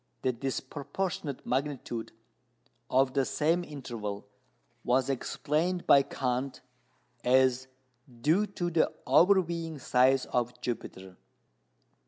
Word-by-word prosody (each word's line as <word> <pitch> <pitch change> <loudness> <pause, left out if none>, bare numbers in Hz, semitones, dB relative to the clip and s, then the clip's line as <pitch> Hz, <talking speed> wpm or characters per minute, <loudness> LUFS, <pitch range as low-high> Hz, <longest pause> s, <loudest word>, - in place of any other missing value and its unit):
The 130 - +2
disproportionate 140 +4 -4
magnitude 130 -3 -2 0.8
of 130 0 +3
the 135 - +2
same 165 +6 +1
interval 115 -10 -6 0.6
was 130 +2 +2
explained 160 +7 -1
by 140 - +7
Kant 130 0 -3 0.6
as 130 0 +3 0.5
due 170 - +3
to 175 -3 -3
the 165 -1 +2
overweening 170 -4 +3
size 130 0 +3
of 125 0 -2
Jupiter. 95 -6 -6
135 Hz, 95 wpm, -29 LUFS, 125-160 Hz, 0.8 s, by